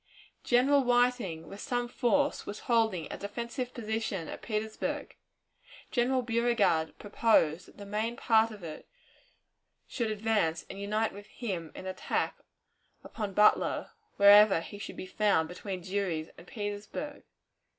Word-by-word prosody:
General 270 +4 +4
Whiting, 245 -9 +1
with 200 - -9
some 245 -1 -1
force, 285 +4 +1
was 205 - -6
holding 220 -8 +1
a - - -7
defensive 235 +5 -4
position 220 -7 -3
at - - -7
Petersburg. 215 -1 -3 0.8
General 255 +1 +2
Beauregard 230 -9 +1
proposed 200 -6 +2
that - - -18
the 205 - -9
main 215 +3 -2
part 225 -1 +3
of 210 -4 -11
it 155 -2 -8 1.0
should 235 -3 -2
advance 210 -6 0
and 195 - -8
unite 215 +2 0
with 205 +1 -11
him 185 -10 -5
in - - -8
an 190 - -2
attack 185 - -2 0.7
upon 205 -4 -5
Butler 210 0 +3 0.3
wherever 200 -2 +8
he 200 +4 -9
should - - -7
be - - -5
found 190 -4 +2
between 185 +2 -6
Drury's 180 -4 -2
and 175 - -15
Petersburg. 205 +6 -5
210 Hz, 140 wpm, -30 LUFS, 190-235 Hz, 1.0 s, wherever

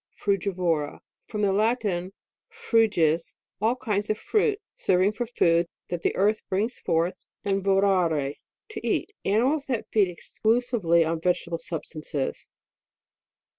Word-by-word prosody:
FRUGIVORA. 180 -6 0 0.3
From 210 -1 -3
the 195 -1 +3
Latin, 205 -4 0 0.4
fruges, 220 - +2 0.3
all 225 +3 +3
kinds 210 -5 -2
of 215 - +1
fruit, 425 - +1 0.2
serving 190 - +2
for 230 +3 -4
food, 170 -7 +2 0.2
that 175 -2 -3
the - - 0
earth 210 +3 +2
brings 215 +6 -1
forth, 170 +3 0 0.3
and 195 -1 0
vorare, 185 -7 +2 0.4
to 430 - -5
eat. 420 - 0
Animals 260 +9 +2
that 250 -5 -1
feed 205 -3 +4
exclusively 210 -2 +1
on 160 0 -2
vegetable 170 -1 0
substances. 155 -4 -4
195 Hz, 125 wpm, -26 LUFS, 170-225 Hz, 0.4 s, feed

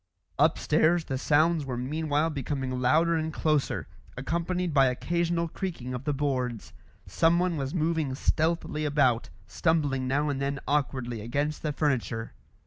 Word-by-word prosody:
Upstairs, 160 +2 +3
the 130 -2 -3
sounds 155 +3 +3
were 130 -3 -4
meanwhile 150 +4 0
becoming 135 -2 -3
louder 160 +7 +3
and 160 -1 -1
closer, 155 -2 0 0.3
accompanied 170 +5 -1
by 135 -2 +5
occasional 170 +6 0
creaking 160 -8 -5
of 125 +2 -5
the 150 - +1
boards. 130 -5 -2 0.3
Someone 170 +2 +2
was 135 0 -3
moving 160 -4 0
stealthily 160 +1 0
about, 140 -6 +2 0.2
stumbling 140 - 0
now 145 +3 +1
and 135 -1 -2
then 140 0 -1
awkwardly 130 -5 -1
against 145 +7 -2
the 155 - -1
furniture. 130 -6 -1
145 Hz, 135 wpm, -28 LUFS, 130-160 Hz, 0.3 s, by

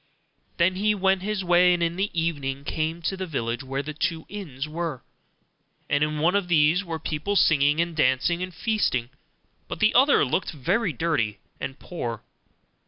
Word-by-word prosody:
Then 185 +2 +2
he 210 +2 +2
went 190 -1 +2
his 205 0 -2
way, 180 0 +5
and 170 - -1
in 170 0 0
the 195 +3 -1
evening 140 -4 -2
came 160 +3 -3
to 190 - -1
the 190 -1 -5
village 120 -6 -2
where 135 +1 -3
the 155 +2 -6
two 160 +1 -2
inns 155 -9 -6
were; 155 -4 -4 0.9
and 145 +1 +3
in 150 0 -1
one 165 +4 +2
of 200 -3 +1
these 165 +2 +3
were 165 -3 -4
people 160 +6 -3
singing, 150 -4 +4
and 170 -1 0
dancing, 150 +4 +2
and 185 0 -4
feasting; 165 - -1 0.6
but - - -6
the 215 0 +4
other 265 - +5
looked 155 +8 -1
very 180 - 0
dirty, 130 -8 -1 0.2
and 135 - -5
poor. 120 -10 -5
165 Hz, 175 wpm, -25 LUFS, 145-185 Hz, 0.9 s, way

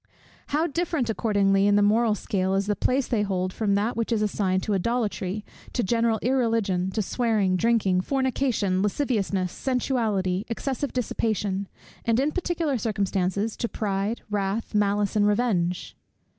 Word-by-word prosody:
How 305 +3 +1
different 325 -7 -1
accordingly, 200 -3 +2
in 205 - +4
the 205 - +4
moral 215 +1 +3
scale, 190 -3 -1
is 195 0 +1
the 205 0 0
place 260 +4 +1
they 225 -4 +1
hold, 185 -2 -1
from 205 -3 +1
that 210 +4 0
which 230 +1 -2
is 215 -2 +2
assigned 190 -3 0
to 210 - -1
idolatry, 210 -1 -1 0.3
to 245 - 0
general 230 +2 +2
irreligion, 225 -7 +1
to 215 - 0
swearing, 215 -4 +1
drinking, 200 -3 +2
fornication, 255 -6 0
lasciviousness, 200 -5 0
sensuality, 220 -8 0
excessive 265 +4 -3
dissipation; 205 -5 -1 0.4
and 230 +1 +2
in 285 +3 +1
particular 330 -6 -1
circumstances, 200 -1 -1
to 235 - -2
pride, 205 +2 -2
wrath, 205 +2 -2
malice, 205 0 +1
and 205 -1 +4
revenge! 205 -6 0
210 Hz, 145 wpm, -25 LUFS, 195-235 Hz, 0.4 s, in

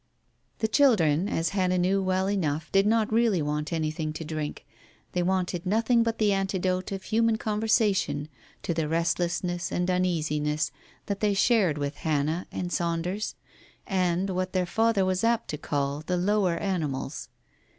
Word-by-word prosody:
The 220 - 0
children, 200 - +3
as 165 -3 0
Hannah 185 -2 +1
knew 190 +2 +2
well 185 0 0
enough, 160 -6 -1
did 195 +1 +4
not 220 0 +2
really 225 -5 +3
want 150 0 -2
anything 155 -1 -2
to 160 +1 -6
drink, 155 -1 -5 0.5
they 180 - 0
wanted 180 -1 0
nothing 225 +5 +2
but 230 0 0
the 210 -2 +3
antidote 190 -1 -1
of 195 -1 -4
human 225 0 +2
conversation 210 - +1 0.4
to 170 - -1
the 160 -2 -1
restlessness 170 +2 -1
and 180 +1 0
uneasiness 155 -4 0 0.3
that 200 -1 -3
they 205 -2 +1
shared 195 -7 +3
with 145 0 -3
Hannah 155 +2 -1
and 180 -1 -4
Saunders, 175 +4 -2 0.5
and 185 -1 0
what 185 0 -2
their 185 -1 +1
father 225 +1 +2
was 185 +1 0
apt 230 0 +1
to 150 - -4
call 140 0 -1
"the 180 +3 -1
lower 185 -2 +1
animals." 165 -9 -3
180 Hz, 155 wpm, -27 LUFS, 160-200 Hz, 0.5 s, did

